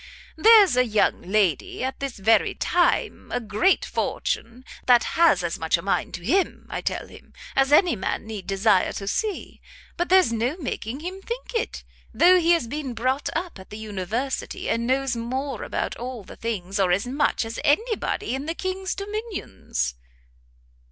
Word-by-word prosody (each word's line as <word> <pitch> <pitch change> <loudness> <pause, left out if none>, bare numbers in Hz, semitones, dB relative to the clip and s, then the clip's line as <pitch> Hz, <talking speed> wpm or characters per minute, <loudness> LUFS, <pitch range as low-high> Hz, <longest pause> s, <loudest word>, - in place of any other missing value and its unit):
there's 415 - +7
a 250 - +5
young 215 -4 +1
lady 190 - 0
at 260 +1 -3
this 275 -4 -4
very 220 +3 +3
time, 350 -1 0
a - - 0
great 220 - +2
fortune, 240 +3 -3 0.2
that 245 -2 +6
has 330 - +4
as 170 -1 -2
much 160 +1 +2
a - - -7
mind 195 - 0
to 175 - -7
him, 375 - +1
I - - -3
tell - - -2
him, - - -16 0.2
as 270 +1 +3
any 335 +1 +5
man 200 - -3
need 210 -4 -7
desire 195 0 +2
to 195 - -6
see; 420 - -3 0.4
but 350 - -1
there's 370 -10 +5
no 240 +8 -1
making 260 - -4
him 370 +3 -6
think 475 +5 -6
it! 460 0 -2 0.3
though 365 +1 +6
he 340 0 +4
has 330 -9 +1
been 275 -1 -4
brought 255 +5 0
up 335 - -3
at 190 - -13
the 210 - -8
university, 220 +5 -3
and 230 +1 0
knows 265 -1 +1
more 255 +2 -3
about - - -3
all 245 -2 -6
the - - -12
things, 200 -4 -3
or 185 -2 +3
as 190 +5 +1
much, 265 -1 0
as 225 +1 -6
any 440 +11 +2
body 415 - -3
in 270 +3 -4
the 330 - -2
king's 375 0 -3
dominions." 400 - -4
255 Hz, 180 wpm, -24 LUFS, 215-345 Hz, 0.4 s, there's